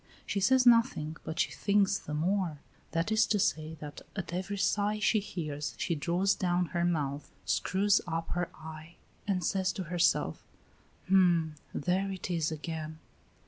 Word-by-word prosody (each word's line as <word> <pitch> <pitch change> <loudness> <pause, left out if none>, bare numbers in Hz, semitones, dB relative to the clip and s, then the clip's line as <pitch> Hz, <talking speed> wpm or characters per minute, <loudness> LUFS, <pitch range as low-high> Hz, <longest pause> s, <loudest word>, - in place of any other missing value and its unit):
She 200 - -1
says 255 +6 +4
nothing, 230 -10 +4
but 160 - -5
she - - +2
thinks 200 -1 +2
the 150 - -5
more. 175 0 0 0.3
That 165 +4 -1
is 220 0 +4
to 215 - +2
say, 160 -4 0
that 145 -1 -8
at 185 -4 -4
every 190 +3 -3
sigh 205 +1 +1
she 215 +1 +3
hears 150 -7 -4
she - - -1
draws 175 +6 +1
down 180 -1 +1
her 170 -1 +1
mouth, 150 -5 -1 0.2
screws 200 +2 +2
up 165 0 -3
her 175 -1 -1
eye, 160 +1 -10 0.3
and 185 -3 0
says 190 -1 +1
to 190 - -4
herself: 175 0 +1 0.6
"Hm! 175 -4 +4 0.2
there 185 +5 0
it 185 -1 -5
is 160 -2 0
again." 155 0 -5
175 Hz, 160 wpm, -31 LUFS, 160-195 Hz, 0.6 s, says